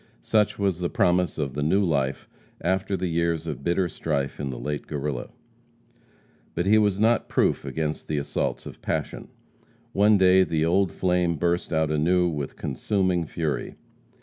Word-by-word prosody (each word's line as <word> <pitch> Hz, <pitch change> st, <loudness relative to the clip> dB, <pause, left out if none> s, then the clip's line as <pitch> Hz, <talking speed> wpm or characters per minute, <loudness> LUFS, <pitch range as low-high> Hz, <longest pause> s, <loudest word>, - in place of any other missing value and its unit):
Such 105 Hz, -, +2 dB
was 95 Hz, -4 st, 0 dB
the 90 Hz, -1 st, -1 dB
promise 90 Hz, -2 st, +1 dB
of 70 Hz, -4 st, -2 dB
the 75 Hz, -, -3 dB
new 95 Hz, +7 st, +2 dB
life 70 Hz, -5 st, -1 dB, 0.3 s
after 95 Hz, +3 st, 0 dB
the 95 Hz, -, -2 dB
years 85 Hz, -1 st, 0 dB
of -, -, -5 dB
bitter 85 Hz, +3 st, +1 dB
strife 70 Hz, -4 st, -3 dB
in 70 Hz, -2 st, -3 dB
the 65 Hz, -, -5 dB
late 75 Hz, +2 st, -4 dB
Guerrilla. 70 Hz, -3 st, -3 dB, 1.3 s
But 85 Hz, -, 0 dB
he 110 Hz, +3 st, +5 dB
was 100 Hz, -2 st, +1 dB
not 115 Hz, +2 st, +2 dB
proof -, -, +1 dB
against 80 Hz, -1 st, -3 dB
the 75 Hz, -, -1 dB
assaults 70 Hz, -, -2 dB
of -, -, -10 dB
passion. -, -, -3 dB, 0.7 s
One 105 Hz, +1 st, +5 dB
day 95 Hz, 0 st, +6 dB
the 80 Hz, -3 st, 0 dB
old 90 Hz, +1 st, +2 dB
flame 90 Hz, -2 st, +1 dB
burst 85 Hz, +3 st, -1 dB
out 80 Hz, -2 st, +1 dB
anew 90 Hz, +4 st, +2 dB
with 75 Hz, -4 st, -4 dB
consuming 90 Hz, -, -1 dB
fury. 80 Hz, -3 st, -3 dB
85 Hz, 165 wpm, -25 LUFS, 75-95 Hz, 1.3 s, day